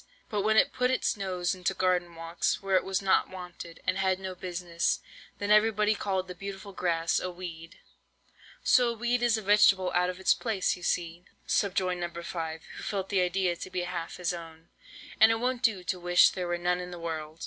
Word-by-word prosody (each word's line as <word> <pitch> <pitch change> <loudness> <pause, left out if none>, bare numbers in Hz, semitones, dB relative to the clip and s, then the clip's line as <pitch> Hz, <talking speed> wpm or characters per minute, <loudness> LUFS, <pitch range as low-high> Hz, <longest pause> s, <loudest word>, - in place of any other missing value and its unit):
But 210 -2 0
when 220 +2 +2
it - - +4
put 250 0 +1
its 260 - +1
nose 185 -3 -1
into 185 +1 -2
garden 180 -2 0
walks, 165 +1 -1
where 195 -1 0
it 185 - +4
was 190 +1 -2
not 190 - +3
wanted, 180 -2 -9
and 185 +1 0
had 190 -1 +1
no 190 -1 -5
business, 175 -2 -2 0.4
then 205 0 -2
everybody 210 0 +4
called 190 -3 -2
the 180 - -6
beautiful 195 +2 -8
Grass 165 -2 0
a 185 - -3
weed." 170 -2 -9 0.9
"So 245 -2 +4
a - - -1
weed 240 +1 0
is 235 -2 +3
a 220 - -5
vegetable 195 -2 +4
out 180 +1 +2
of 180 0 -6
its 190 - +4
place, 220 -6 -1
you 180 - -13
see," 175 0 -2 0.2
subjoined 185 -2 0
No. 175 - -2
5, 160 -2 -5
who - - -7
felt 195 -2 -3
the 195 -2 +2
idea 180 0 +1
to - - -7
be 185 - -2
half 175 -2 -5
his 180 -1 -1
own, 165 -1 -10 0.5
"and 220 0 +8
it - - +2
won't 250 0 -1
do 220 -8 +1
to 180 0 -2
wish 175 0 +5
there 180 -1 -4
were 175 0 -1
none 180 +1 0
in 180 0 -6
the 175 - -8
world." 160 -1 -5
185 Hz, 215 wpm, -29 LUFS, 175-200 Hz, 0.9 s, and